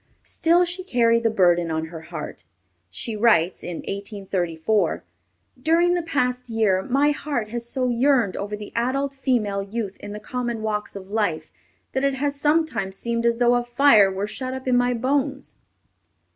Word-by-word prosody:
Still 340 +2 +3
she 355 +2 -3
carried 230 -8 +2
the 230 - +2
burden 175 -5 +3
on 160 0 -2
her 160 - -7
heart. - - -8 0.5
She 215 - -3
writes, 210 -6 +3
in 175 -2 -5
1834, 195 -2 -1 0.6
"During 335 +4 +3
the 350 - +1
past 250 -6 -1
year 215 -5 +2
my 275 +7 +2
heart 285 -7 -3
has 235 +1 -4
so 255 -1 0
yearned 240 -4 +2
over 205 +1 -4
the 210 0 -9
adult 270 +4 0
female 235 -7 0
youth 200 0 -5
in 205 - -8
the 210 - -6
common 235 0 -4
walks 210 -1 -3
of 195 0 -9
life, 175 -8 -1 0.4
that 265 - -1
it 275 -1 +2
has 285 +1 -1
sometimes 285 -10 0
seemed 235 0 -1
as 235 0 +1
though 245 0 +4
a 245 0 +2
fire 240 -5 +5
were 190 +2 -2
shut 255 +4 -4
up 260 0 -8
in 250 - +3
my 245 0 +2
bones." 275 +3 -1
235 Hz, 170 wpm, -23 LUFS, 200-265 Hz, 0.6 s, fire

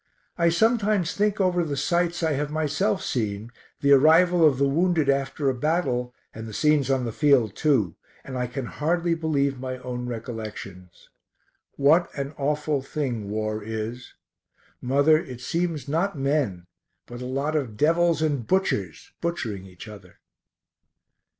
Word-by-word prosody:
I 170 -1 +3
sometimes 210 -1 +2
think 210 0 0
over 180 -2 +2
the 145 -3 -3
sights 170 +4 0
I 160 - +2
have 145 +1 -1
myself 155 +6 0
seen, 110 -1 -3 0.3
the 140 - +3
arrival 165 +5 +6
of 150 -5 +5
the 140 +1 +2
wounded 160 0 +1
after 140 +1 0
a 135 - +3
battle, 130 -3 -1 0.2
and 110 0 -8
the 110 - -8
scenes 150 -3 +2
on 130 -2 +1
the 115 - -3
field 130 -6 +3
too, 130 - +1 0.3
and 130 - -8
I 125 -1 -1
can 130 +1 -5
hardly 170 +6 0
believe 140 -5 0
my 130 0 -4
own 125 -1 -5
recollections. 110 -6 -8 0.6
What 160 +5 +3
an 140 +1 -4
awful 150 0 0
thing 125 -7 -3
war 110 0 -2
is! 110 +3 -6 0.7
Mother, 140 +5 +4
it 130 -7 -8
seems 165 0 -2
not 165 +4 -1
men 135 - -1 0.4
but 120 +1 -9
a 125 - -5
lot 140 +4 -2
of 125 -8 -2
devils 165 +2 +2
and 145 -7 -1
butchers 105 - -1
butchering 110 - -3
each 90 +3 -12
other. 105 -2 -13
140 Hz, 150 wpm, -25 LUFS, 120-160 Hz, 0.7 s, arrival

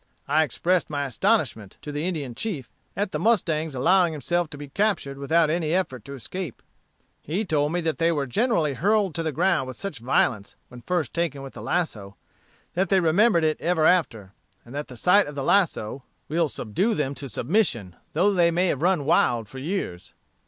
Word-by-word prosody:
I 150 +3 +3
expressed 170 +5 0
my 145 -1 -2
astonishment, 135 - 0
to 150 - -5
the 150 +4 -2
Indian 150 -9 -3
chief, 140 - -5 0.3
at 200 -1 -1
the - - -2
mustang's 160 - +1
allowing 175 +5 +3
himself 170 +3 -1
to 145 - -9
be 145 0 -8
captured 155 -5 -1
without 160 +3 +2
any 165 -1 0
effort 130 - -2
to 140 - -7
escape. 145 - -7 0.6
He 185 +9 -2
told 150 -4 +1
me 175 +1 0
that 160 -1 -2
they 165 0 +3
were 145 -4 -1
generally 170 - +1
hurled 200 - +1
to 165 - -2
the 160 -1 -1
ground 170 -3 +1
with 130 - -7
such 195 - -6
violence, 115 -4 0
when 125 -1 -11
first 165 +2 -2
taken 165 -5 -2
with 135 - -9
the - - -9
lasso, 105 - -2 0.6
that 185 +1 0
they 190 - +4
remembered 175 +2 +3
it 155 -1 0
ever 165 -2 +2
after; 115 - +1 0.3
and 120 - -12
that 145 +1 -4
the 125 - -11
sight 185 - +4
of 145 - -8
the 140 - -3
lasso 140 - +1 0.3
will 165 0 +1
subdue 190 - -1
them 140 -4 -1
to 140 -1 -7
submission, 120 - 0 0.2
though 205 +2 +3
they 175 -3 +4
may 175 +2 +1
have 140 - -1
run 175 -4 +2
wild 120 -8 +2
for 130 +5 -9
years." 140 - -4
155 Hz, 195 wpm, -25 LUFS, 135-180 Hz, 0.6 s, they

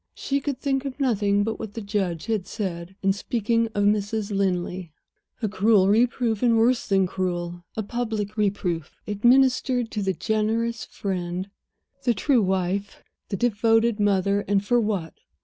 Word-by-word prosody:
She 280 0 -1
could 280 -1 -3
think 270 -1 0
of 275 0 -6
nothing 205 -6 +2
but 220 +1 -3
what 220 -2 -7
the - - -3
judge 195 -5 -2
had 215 -5 -1
said, 180 -2 -5
in 195 0 +3
speaking 230 +2 0
of 205 - +1
Mrs. 205 0 0
Linley. 180 -2 -1 0.5
A - - +2
cruel 200 0 +3
reproof, 230 0 +2
and 235 -2 +4
worse 240 +2 +2
than 195 -2 +3
cruel, 175 -1 -3
a 220 - -1
public 215 -2 -3
reproof, 190 -7 -1
administered 245 +2 +3
to 210 - -2
the 195 -1 0
generous 220 +3 -1
friend, 185 0 -4 0.5
the 245 -3 +1
true 250 +4 +3
wife, 190 +1 -1 0.3
the 195 - -2
devoted 225 0 +2
mother 200 0 +2
and 200 0 +1
for 240 +3 +3
what? 200 -7 -2
205 Hz, 155 wpm, -24 LUFS, 190-230 Hz, 0.5 s, and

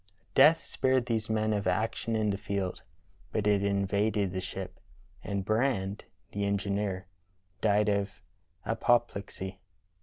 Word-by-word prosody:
" 95 - -37
Death 150 +5 +7
spared 130 -2 +1
these 110 -3 -1
men 110 0 +1
of 100 -1 -1
action 115 +1 0
in 110 -1 +2
the 100 - -2
field, 100 -2 -2 0.5
but 105 0 -1
it 100 -1 +3
invaded 100 0 +1
the 95 - -2
ship, 95 0 -6 0.4
and 100 -2 -2
Brand, 110 -3 0 0.3
the 100 - -2
engineer, 100 -1 -1 0.6
died 105 -1 +3
of 100 -1 +1 0.6
apo 120 - +4
plexy. 100 -4 -7
100 Hz, 140 wpm, -30 LUFS, 100-110 Hz, 0.6 s, Death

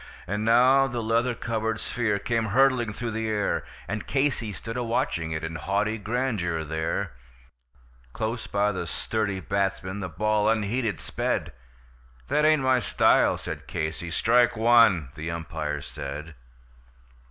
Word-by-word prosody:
And 105 +2 -2
now 130 +4 +5
the 120 -2 -3
leather 115 +2 +1
covered 115 -1 -2
sphere 115 -4 -1
came 115 +2 -1
hurtling 125 0 +3
through 115 +2 -4
the 110 0 -2
air, 105 -2 0 0.2
And 105 +2 -4
Casey 135 -5 0
stood 115 +3 -7
a 125 - -1
watching 85 -8 -1
it 80 0 -3
in 80 0 -4
haughty 105 +4 -1
grandeur 105 -8 -1
there; 80 +1 -2 1.0
Close 110 - -3
by 100 +1 +1
the 95 - -4
sturdy 100 -4 -2
batsman 95 0 -2
the 95 -2 -4
ball 105 +5 +1
unheeded 110 -3 0
sped: - - -2 0.8
"That 150 - +3
ain't 155 -3 +4
my 130 -1 +4
style," 115 - +3
said - - -7
Casey. 80 +1 -3
"Strike 120 +6 +3
one," 110 - +5
the 80 +1 -5
umpire 80 -3 -4
said. 75 +4 -7
110 Hz, 140 wpm, -26 LUFS, 90-120 Hz, 1.0 s, now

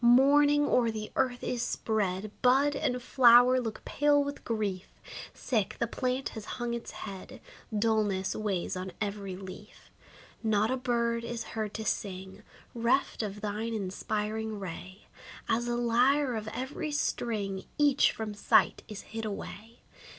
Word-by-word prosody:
Mourning 285 +4 +6
o'er 245 -4 +3
the 215 -1 -5
earth 255 -2 0
is 245 - -1
spread; 210 -3 -1
Bud 275 +3 +4
and 250 -2 0
flower 245 0 +6
look 225 -3 -6
pale 290 0 +3
with 285 0 -6
grief. 205 -5 -2 0.4
Sick, 215 -6 -1
the - - +1
plant 255 +3 -2
has 220 - -8
hung 240 -1 -2
its 235 0 -5 0.2
head; 195 -2 -8 0.4
Dulness 205 -3 +1
weighs 200 -5 -2
on 185 0 -5
every 200 -2 -3
leaf. 185 0 -11 0.5
Not 220 0 +2
a - - +2
bird 235 -2 0
is 235 0 -4
heard 215 -2 -3
to 220 - -4
sing. 190 -1 -3 0.3
Reft 240 +3 +1
of 210 -1 -5
thine 215 +2 -2
inspiring 215 +2 -3
ray. 185 +1 -8 0.4
As 235 +1 +1
a 240 - 0
lyre 245 +3 +3
of 215 -1 -4
every 260 +6 -4
string, 210 -9 -2
Each 290 -2 +4
from 220 -1 -5
sight 205 - +3
is 210 -1 -7
hid 225 0 -7
away. 215 +2 -7
225 Hz, 145 wpm, -30 LUFS, 205-250 Hz, 0.5 s, Mourning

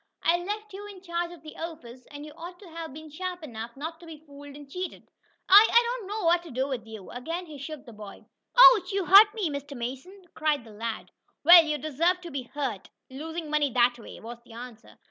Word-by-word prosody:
"I 335 - +4
left 415 +3 -5
you 405 +2 -8
in 390 -3 -12
charge 345 -1 -3
of 340 -3 -13
the 310 - -11
office, 260 -7 -9
and 290 0 -9
you 305 - -11
ought 350 +2 -9
to 375 -1 -14
have 325 -1 -7
been 310 +2 -11
sharp 360 +2 -5
enough 235 -3 -8
not 320 +3 -6
to 340 - -14
be 320 -1 -9
fooled 285 -2 -13
and 290 -1 -12
cheated. 360 +6 -7 0.4
I 410 +4 +9
I 475 - +7 0.2
don't 405 - -10
know 415 -1 -4
what 340 +1 +4
to 345 - -12
do 265 +1 -2
to 230 -2 -11
you!" 215 -4 -10
Again 330 +9 -5
he 300 -4 -11
shook 290 0 -8
the 235 - -12
boy. 210 -2 -11 0.3
"Ouch! 430 -7 +8
You 390 -2 -1
hurt, 400 +4 +9
Mr. 290 - -4
Mason!" 265 +12 -7
cried 305 -4 0
the 225 - -14
lad. 225 +1 -6 0.3
"Well, 340 +2 +10
you 305 -1 -2
deserve 320 +5 0
to 345 -2 -9
be 260 -3 -6
hurt, 265 -9 -4 0.2
losing 320 +3 -6
money 300 -2 +2
that 245 0 +3
way," - - -11
was 235 +1 -10
the 235 - -16
answer. 240 -1 -11
310 Hz, 225 wpm, -27 LUFS, 260-350 Hz, 0.4 s, Well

